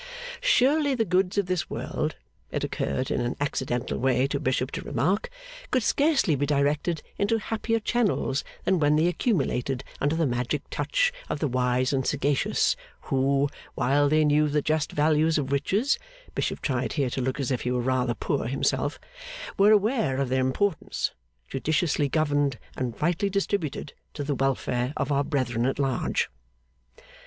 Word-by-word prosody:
Surely 290 - +3
the 225 -2 +1
goods 185 +1 +1
of 200 - +2
this 180 -2 -1
world, - - -3 0.3
it - - -3
occurred 130 0 -2
in - - 0
an 120 +1 -1
accidental 130 -3 -2
way 130 0 +2
to 140 +1 -1
Bishop 130 -2 0
to - - -4
remark, 180 - 0 0.4
could 255 -3 +1
scarcely 280 - +3
be 145 +1 0
directed 150 +3 +1 0.2
into 205 +3 +2
happier 225 +1 -1
channels 210 - 0 0.2
than 190 -2 +2
when 150 0 +4
they 155 +2 +3
accumulated 135 - 0 0.2
under 145 +3 +1
the 165 0 +2
magic 125 +3 -1
touch - - +1 0.2
of - - -1
the 150 - 0
wise 125 +1 +1
and 130 -1 0
sagacious, 140 0 +1 0.3
who, 135 +1 +2 0.3
while 140 +3 +3
they 155 +1 +4
knew 150 +1 +4
the 150 0 +1
just 155 -1 0
value 155 +1 +3
of 150 -4 0
riches 195 - +1 0.3
(Bishop - - -2
tried 130 -3 -1
here 140 -5 0
to 130 - -2
look 130 +3 -2
as 135 -1 -1
if 125 - 0
he 125 - -2
were 125 0 0
rather 125 -1 +1
poor 115 - -1
himself), 135 +2 0 0.6
were 200 +1 +5
aware 215 - +3
of 135 -2 0
their 130 0 +2
importance, 160 +8 0 0.4
judiciously 145 +1 0
governed 145 -3 +1 0.2
and 125 -3 -3
rightly 175 +5 +1
distributed, 195 -7 -2 0.2
to 145 - -3
the 145 +1 -1
welfare 130 -1 0
of 140 - -1
our 140 0 +2
brethren 125 -5 0
at 135 - -1
large. 135 -3 0
145 Hz, 165 wpm, -26 LUFS, 130-180 Hz, 0.6 s, were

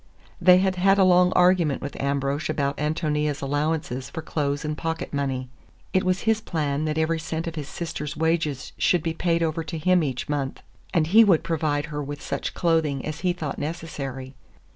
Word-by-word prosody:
They 180 0 +7
had 190 0 +1
had 195 +2 +4
a 195 - +5
long 180 0 +5
argument 180 -5 +3
with 140 - -5
Ambrosch 140 +1 -1
about 140 -2 -1
Ántonia's 150 -1 -1
allowance 145 -2 -2
for 160 - -6
clothes 145 -1 -2
and 150 0 -2
pocket 160 +2 -4
money. 135 -2 -2 0.5
It 185 - +3
was 185 +1 +1
his 220 0 +1
plan 150 -4 -1
that 155 0 -1
every 160 +1 +1
cent 160 0 -4
of 165 - -4
his 150 -3 -5
sister's 150 -2 -5
wages 160 -4 -1
should 175 -4 +3
be 165 - -1
paid 170 0 +1
over 160 0 -1
to 160 +1 -5
him 180 +3 +3
each 130 -4 -3
month, 145 -2 -3 0.3
and 165 -4 +2
he 215 +8 +7
would 190 -7 +4
provide 150 -3 0
her 150 - -2
with 145 +1 -6
such - - -4
clothing 160 -6 +1
as 155 +1 -4
he 180 - +1
thought 160 -5 -4
necessary. 140 -5 -5
155 Hz, 190 wpm, -25 LUFS, 145-170 Hz, 0.5 s, They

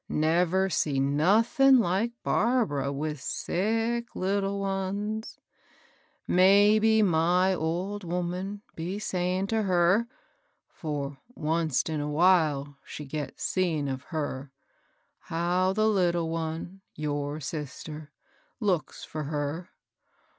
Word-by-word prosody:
Never 175 +4 +2
see 150 -6 0
nothin' 215 - +4
like 210 +2 +1
Barbara 210 - +1
with 150 0 -4
sick 225 - -1
little 195 +1 -1
ones 200 +3 -3 0.9
1 - - -1
Maybe 210 +3 +5
my 180 +1 +3
old 185 +5 -2
woman'd 180 +3 -3
be 175 +5 -4
sayin* 185 -2 -1
to 220 +2 0
her, 185 +3 +3 0.3
— - - -45
for 145 -3 -3 0.2
onct 160 -2 0
in 155 -2 -2
a 145 - -3
while 150 -4 +2
she 150 - -8
gets 145 +1 -5
seein' 165 -6 0
of 135 0 -4
her, 145 -4 -4 0.3
— - - -40 0.2
how 175 +3 0
the 215 +2 +2
little 175 -5 +1
one 165 +3 -4
— - - -51
your 145 0 -2
sister 150 +1 -6 0.2
— - - -38
looks 190 -8 -1
for 155 -1 -5
her. 150 +3 -3
175 Hz, 120 wpm, -28 LUFS, 155-200 Hz, 0.9 s, Maybe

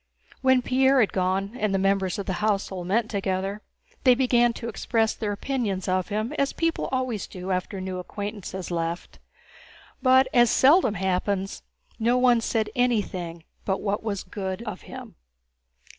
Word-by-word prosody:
When 260 -1 +4
Pierre 265 +2 +3
had 220 - +2
gone 190 +3 0
and 210 -3 +1
the - - +3
members 195 -1 +1
of 200 - -4
the 190 - -2
household 195 -4 -1
met 220 +4 +1
together, 195 0 -2 0.4
they 255 -2 +6
began 240 -2 +3
to 230 - -6
express 225 0 0
their 210 -2 -3
opinions 205 -4 -2
of 185 -1 0
him 215 +5 -2
as 280 0 +1
people 330 0 -1
always 255 -5 -2
do 185 +1 -6
after 185 +2 -2
a - - -5
new 185 -1 -4
acquaintance 205 +2 -6
has 190 -1 -5
left, 170 0 -3 0.8
but 260 0 +5
as 240 -1 +5
seldom 265 - +5
happens, 190 +1 -1 0.4
no 235 +2 +2
one 245 -2 +4
said 220 -2 -1
anything 185 -9 -1 0.2
but 190 -1 -1
what 205 0 -1
was 205 -3 -3
good 190 0 -5
of 215 -5 -6
him. - - -9
205 Hz, 165 wpm, -25 LUFS, 190-240 Hz, 0.8 s, they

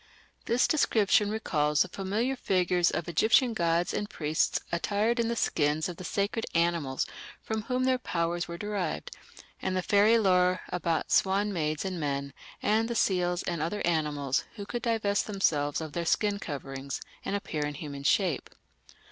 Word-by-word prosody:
This 240 +2 +3
description 210 -8 +3
recalls 150 -9 +1
the - - -7
familiar 205 +8 -1
figures 180 -6 +2
of 170 - -3
Egyptian 225 - +3
gods 170 -2 +1
and 210 - -2
priests 155 0 0
attired 210 +7 0
in 230 - +2
the 235 - -1
skins 150 -6 +1
of 175 -2 -7
the - - -8
sacred 200 +5 -1
animals 170 -6 +1 0.3
from 220 0 -3
whom 255 +1 0
their 255 -1 +2
powers 170 -5 -1
were 170 0 -6
derived, 205 -4 -3 0.5
and 185 -1 -1
the 185 - -1
fairy 210 +4 +5
lore 185 -3 +3
about 165 -2 -1
swan 200 +2 +2
maids 155 -1 -1
and 185 -2 -3
men, 140 -2 -2 0.3
and 220 +2 +2
the 235 - -3
seals 180 -4 +1
and 170 -3 -2
other 170 +6 -2
animals 150 -5 0
who 205 -3 -6
could 240 +3 -4
divest 220 -3 0
themselves 155 -8 +1
of 155 -2 -6
their 170 - -2
"skin 205 +4 +1
coverings" 135 -3 -5 0.2
and 200 - -2
appear 165 -7 -3
in 145 0 -3
human 140 -1 -6
shape. 170 0 +1
180 Hz, 165 wpm, -29 LUFS, 155-210 Hz, 0.5 s, fairy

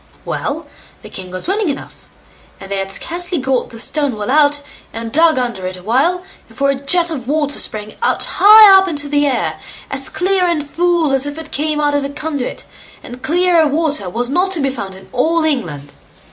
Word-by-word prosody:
Well! - - -4 0.4
the - - -11
king 185 -2 -7
was 185 - -5
willing 395 -1 0
enough; 280 - -7 0.5
and 195 - -11
they 200 - -1
had 195 0 -3
scarcely 350 - -3
got 260 -2 -1
the 230 - -11
stone 280 -1 -1
well 205 -1 -3
out, 290 -1 +3 0.3
and 230 0 -6
dug 320 +2 +4
under 235 -7 -2
it 185 0 -6
a 180 - -14
while, 285 - +1 0.2
before 275 0 0
a - - 0
jet 335 +6 +2
of 260 -6 -5
water 290 0 0
sprang 215 0 -3
out - - 0
high 420 -1 +8
up 385 - 0
into 290 -4 -1
the 290 0 +1
air, 275 - -1 0.3
as - - -2
clear 375 0 +1
and 310 -4 -1
full 340 -1 +1
as 270 +1 0
if 290 +1 -6
it 320 -1 -8
came 300 +1 -1
out 295 -1 +1
of 285 -1 0
a 275 - -3
conduit, 285 -2 -4 0.4
and 245 +1 -10
clearer 345 -1 +3
water 290 - -1
was 240 +6 -2
not 360 +8 +1
to 345 - +1
be 275 -2 0
found 200 -7 -6
in 190 - -14
all 320 +6 +1
England. 165 - -2
290 Hz, 205 wpm, -16 LUFS, 245-330 Hz, 0.5 s, high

